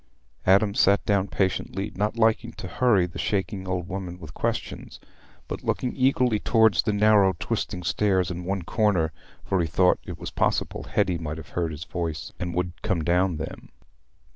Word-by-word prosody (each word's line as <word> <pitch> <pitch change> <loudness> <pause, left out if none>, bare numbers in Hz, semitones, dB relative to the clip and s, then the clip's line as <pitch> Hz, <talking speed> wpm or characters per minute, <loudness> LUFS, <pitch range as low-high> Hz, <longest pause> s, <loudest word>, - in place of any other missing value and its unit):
Adam 100 +2 +5
sat 100 0 +3
down 100 -1 +2
patiently, 95 +1 -1
not 105 +3 -1
liking 110 -1 +2
to - - -8
hurry 110 -8 +3
the 90 - -8
shaking 95 -1 -2
old 90 -2 -2
woman 90 -1 -5
with 80 -6 -11
questions, - - -4 0.5
but - - -5
looking 125 - -1
eagerly 130 -4 +2
towards 110 -5 +4
the 110 - 0
narrow 105 -2 +4
twisting 90 - -3
stairs 95 -1 +1
in 90 0 -5
one 95 0 -2
corner, 90 -5 +1 0.3
for 95 -2 0
he 85 - 0
thought 90 +3 +3
it - - -7
was - - -7
possible - - -1
Hetty 90 -2 0
might 75 -1 -4
have 80 -2 -10
heard 85 -2 -1
his 75 +1 -6
voice 85 -3 -4
and 85 -1 -3
would 90 0 -3
come 95 -7 0
down 90 +1 +2
them. 80 +1 -7
95 Hz, 175 wpm, -25 LUFS, 85-105 Hz, 0.5 s, Adam